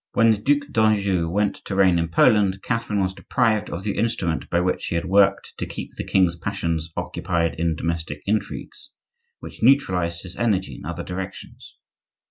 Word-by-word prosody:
When 115 0 +5
the 110 - +1
Duc 145 +5 +1
d'Anjou 100 -6 +2
went 100 +3 0
to 100 - -4
reign 95 -3 +4
in 85 - 0
Poland 95 +2 +3
Catherine 115 -4 -1
was 95 0 0
deprived 110 0 0
of 85 - -5
the 105 -1 -2
instrument 90 -8 -1
by 85 - +2
which 90 +1 0
she - - -3
had 85 +2 -1
worked 100 +1 +3
to - - -3
keep - - -7
the - - -5
king's 90 -3 +2
passions 85 -4 -2
occupied 85 -2 -1
in 85 -1 +1
domestic 80 -2 -4
intrigues, 105 0 -3 0.5
which - - -10
neutralized 90 -10 +2
his 90 -2 -8
energy 95 - 0
in - - -11
other - - -4
directions. 95 +1 -8
95 Hz, 175 wpm, -23 LUFS, 85-105 Hz, 0.5 s, When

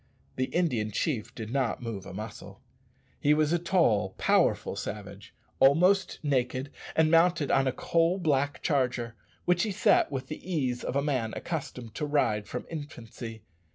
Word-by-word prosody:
The 130 - 0
Indian 130 -11 0
chief 115 +1 -2
did 110 -1 -6
not 130 -4 0
move 105 -5 -5
a - - -8
muscle. 105 +1 -8 0.6
He 150 +1 +4
was 155 +1 +2
a 175 - +2
tall, 115 - +2
powerful - - +2
savage, - - -7 0.2
almost 180 +8 +4
naked, 130 -1 0 0.2
and 160 -1 +4
mounted 165 -3 +4
on 135 0 +3
a - - +2
coal 165 +6 +1
black 145 -5 0
charger, 125 -5 0 0.3
which 180 0 +3
he 215 - 0
sat 190 -6 +3
with 135 -2 -3
the 155 +3 -7
ease 135 -9 -1
of - - -3
a 140 - +2
man 130 -7 -1
accustomed 125 -8 -5
to 150 - -3
ride 115 -8 +1
from - - -5
infancy. 120 -7 -8
140 Hz, 160 wpm, -28 LUFS, 115-160 Hz, 0.6 s, He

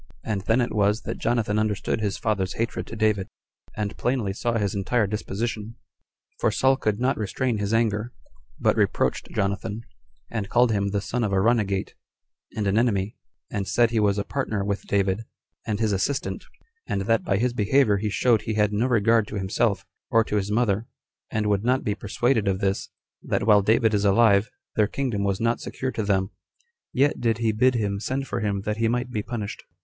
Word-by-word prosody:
And 105 -3 -2
then 115 +3 +3
it 120 - -1
was 105 +1 +2
that - - -5
Jonathan 110 -3 +1
understood 110 0 -1
his 100 -2 -1
father's 95 -5 -1
hatred 115 +1 -3
to - - -7
David, 105 -3 +1 0.5
and 105 -1 -2
plainly 120 -6 0
saw 120 +3 -1
his 100 -3 0
entire 105 +3 +1
disposition; 105 +2 -3 0.6
for - - +3
Saul 130 +5 +3
could 110 -4 -1
not 130 +2 +1
restrain 110 +2 -1
his 100 0 -1
anger, 115 0 +1 0.5
but - - +3
reproached - - 0
Jonathan, 100 +2 -2 0.5
and 105 -4 -3
called 120 -1 +4
him 100 -2 +1
the 100 0 -1
son 120 +4 -2
of 105 - 0
a 95 - +2
runagate, 100 -3 +1 0.6
and 105 - 0
an 100 +2 +3
enemy; 105 -4 0 0.4
and 100 -2 -2
said 120 -1 +3
he 115 - +1
was 100 -1 +2
a 100 - 0
partner 110 -7 -2
with 100 0 -3
David, 100 +1 +1 0.5
and 105 -1 -1
his 110 -2 +1
assistant, 100 +8 -1 0.4
and 100 - -1
that 115 +3 +1
by 100 - +1
his 120 +3 +1
behavior 110 -1 +3
he 105 +2 -2
showed 115 +1 +2
he 110 - -3
had 105 -1 +2
no 110 +5 +1
regard 115 -2 +3
to 105 - -7
himself, 100 +2 0 0.2
or 115 0 +4
to 105 - -2
his 100 0 -1
mother, 110 0 +1 0.4
and 110 -1 -1
would 100 -1 +1
not 130 +2 +2
be 105 - 0
persuaded 110 +2 0
of 95 -1 +1
this, 100 -1 -1 0.3
that - - -1
while 105 -2 +6
David 110 +2 +3
is 100 -1 +2
alive, 100 0 +4 0.3
their 105 -1 +3
kingdom 120 -5 -2
was 100 -1 0
not 115 +1 +1
secure 130 0 -4
to 115 - -3
them; 100 -1 0 0.6
yet 140 +3 +1
did 115 -2 +1
he 115 -1 +1
bid 125 +4 +3
him 100 -3 -1
send 130 +5 -2
for 120 - -3
him, 100 -3 -1
that 105 +1 -2
he 115 0 +2
might 125 +2 -1
be 110 - -1
punished. 105 -1 -5
105 Hz, 200 wpm, -25 LUFS, 100-115 Hz, 0.6 s, while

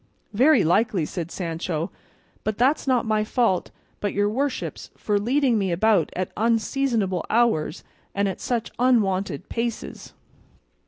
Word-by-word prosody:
"Very 260 +2 +5
likely," 185 0 +2
said 170 +1 -5
Sancho, 165 -2 -3 0.5
"but 215 -1 -2
that's 270 +4 +2
not 250 -3 +2
my 215 -1 +1
fault, 215 -4 +1 0.3
but 205 - -2
your 205 +1 +2
worship's, 275 +4 -3
for 205 -1 0
leading 250 +1 +2
me 190 -2 0
about 190 -1 +3
at 185 0 -2
unseasonable 225 -4 0
hours 225 -9 +1 0.3
and 200 0 +1
at 190 - -4
such 235 -2 -2
unwonted 195 - +1
paces." 235 -1 -4
215 Hz, 130 wpm, -24 LUFS, 185-240 Hz, 0.5 s, Very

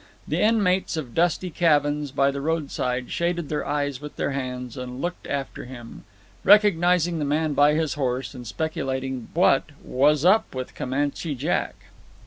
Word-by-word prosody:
The - - 0
inmates 200 -6 +2
of 130 -7 -5
dusty 175 +1 +1
cabins 150 -3 +2
by 140 +1 +2
the 140 0 -5
roadside 140 -5 -2
shaded 170 -2 -1
their 150 - -1
eyes 145 -2 -2
with 150 0 -8
their - - -1
hands 125 -3 -4
and 125 0 -6
looked 175 +4 -4
after 140 -3 -4
him, 120 -2 -11 0.4
recognizing 180 -4 +4
the - - -1
man 150 +1 0
by 145 +1 +4
his 160 -1 0
horse, 130 -2 -2
and 125 -3 -9
speculating 135 -3 -3
what - - +4
"was 145 +4 +2
up 195 -4 +4
with 130 0 -5
Comanche 145 +3 -2
Jack." 145 +7 -1
145 Hz, 155 wpm, -24 LUFS, 130-165 Hz, 0.4 s, recognizing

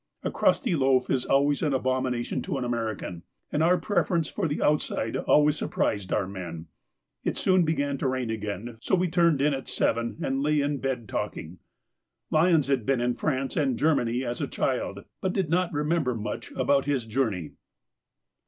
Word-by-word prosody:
A - - -1
crusty 230 - +2
loaf 130 -3 +2
is 130 -2 +1
always 140 +1 +2
an 145 -3 +1
abomination 130 -2 -1
to 140 - -3
an 130 - -2
American, 115 -7 -3 0.3
and 150 - 0
our 175 +3 +4
preference 170 -2 0
for 195 -5 -2
the 145 - -2
outside 145 -6 0
always 150 0 +3
surprised 100 -2 -1
our 100 - +1
men. 85 -4 -7 0.6
It - - -1
soon 185 -1 +3
began 140 -3 0
to - - 0
rain 130 -3 -1
again, 110 +1 -5
so 190 - +2
we 180 0 +1
turned 165 -4 +3
in 150 0 +3
at 135 -1 -5
seven, 115 0 0
and 135 +1 0
lay 150 +1 +2
in 145 0 0
bed 125 -4 -2
talking. 85 -1 -4 0.7
Lyons 160 -2 +4
had 135 -4 +1
been 135 +2 +1
in 120 0 +1
France 135 0 -2
and 135 -6 +1
Germany 130 -5 +1
as 120 0 -3
a - - -1
child, - - -2 0.2
but 185 -1 0
did 185 -5 -1
not 180 0 +2
remember 150 -3 0
much 110 -1 -5
about 140 -1 +2
his 140 -5 0
journey. 110 - -1
135 Hz, 180 wpm, -27 LUFS, 120-150 Hz, 0.7 s, our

